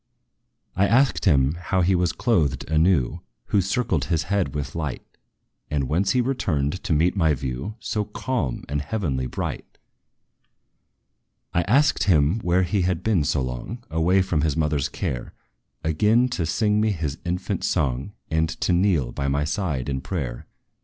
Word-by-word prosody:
I 100 +2 +3
asked 130 +4 +3
him 70 -5 +4
how 95 +1 0
he 90 +2 +3
was 90 -2 +2
clothed 75 - 0
anew 80 -4 +2 0.3
Who 100 - +3
circled 95 - 0
his 80 -2 0
head 90 -7 -1
with 70 -1 -3
light 75 -6 -4 0.6
And 70 -3 -1
whence 90 - +1
he 125 - +3
returned 90 - -1
to - - -2
meet 85 +5 +2
my 80 -6 +3
view 65 +9 -4
So 105 -2 -2
calm 105 - -3
and 75 +1 -2
heavenly 70 -7 -2
bright. - - -5 1.8
I 90 - +3
asked 140 +8 +3
him 85 +1 +3
where 90 -2 +2
he 100 +2 0
had 90 -2 0
been 105 -8 +2
so 70 - 0
long 65 - -5
Away 90 +4 +3
from 85 -5 0
his 80 -1 0
mother's 75 -3 0
care - - -4 0.5
Again 105 +10 +3
to 90 -9 -2
sing 105 +4 +2
me 110 -1 +2
his 80 -3 -3
infant 90 +1 -2
song, 70 +8 -1 0.2
And 80 0 +2
to 90 - +2
kneel 85 -9 +2
by 70 - -3
my 70 +1 +1
side 75 - -2
in 65 -1 -2
prayer. 65 -9 -4
85 Hz, 160 wpm, -24 LUFS, 70-100 Hz, 1.8 s, him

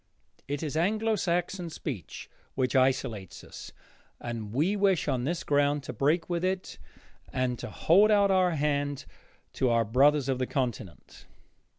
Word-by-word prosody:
It 145 +2 -3
is 150 -1 -4
Anglo 215 +6 +1
Saxon 175 -1 -2
speech 135 - -7 0.3
which 130 -2 0
isolates 130 -7 0
us, - - -10 0.5
and 115 -3 -6
we 155 - +1
wish 195 -6 +2
on 125 -1 0
this 170 +3 -2
ground 145 0 +1
to - - -6
break 155 +5 +1
with 175 0 -2
it 185 0 -2 0.5
and 125 -1 -1
to - - -6
hold 200 +6 +4
out 200 -2 +4
our 185 -3 +3
hand 145 -1 -1 0.5
to 130 - +1
our 115 -1 +2
brothers 140 +5 +3
of 130 -2 -1
the 130 - -1
continent. 115 - -5
145 Hz, 155 wpm, -28 LUFS, 130-175 Hz, 0.5 s, hold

